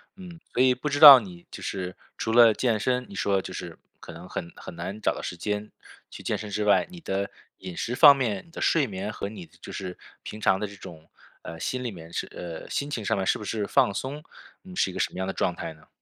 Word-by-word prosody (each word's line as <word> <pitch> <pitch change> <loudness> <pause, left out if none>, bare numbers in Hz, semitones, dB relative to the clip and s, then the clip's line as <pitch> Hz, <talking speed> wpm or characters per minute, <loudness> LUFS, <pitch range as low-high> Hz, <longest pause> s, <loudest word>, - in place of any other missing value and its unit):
嗯， 180 -3 -11
所 125 - +2
以， 130 -1 +5
不 150 - -5
知 145 0 -1
道 140 -4 +12
你 90 -5 -11
就 - - -9
是， 90 -2 -4 0.2
除 110 - -3
了 115 -1 +7
健 115 -3 0
身， 125 +3 0
你 100 - -10
说 95 -1 +1
就 - - -8
是， - - -7 0.2
可 85 - -11
能 85 +3 -11
很 85 - -5
很 - - -10
难 95 +5 -6
找 - - +1
到 - - -6
时 90 - -5
间 105 +4 -4 0.4
去 - - -9
健 - - -1
身 105 - -7
之 105 +1 -1
外， 105 - +4
你 175 -2 -11
的 100 -6 -2 0.3
饮 90 - -8
食 125 - -3
方 145 -1 +9
面， 115 -8 -2
你 165 - -21
的 - - -8
睡 155 -4 +3
眠， 100 -1 -5
和 100 - -5
你 95 -6 -10
就 - - -13
是， 90 -2 -6 0.2
平 105 - -8
常 95 -1 +2
这 105 - -1
种， 80 -5 -12 0.3
呃， 80 - -9
心 125 +7 -3
里 120 - -2
面 85 -4 -11
是， - - -3
呃 85 -2 -8
心 140 - -2
情 110 - -3
上 - - 0
面， 95 - -1
是 - - +1
不 - - -7
是 105 -1 -2
放 130 -4 +3
松？ 145 +3 -5 0.4
你 185 -1 -12
是 95 - +1
一 - - -12
个 - - -6
什 - - 0
么 - - -10
样 95 - -2
的 95 - -3
状 90 - -1
态 80 - -6
呢？ 80 - -22
105 Hz, 280 characters per minute, -26 LUFS, 95-125 Hz, 0.4 s, 道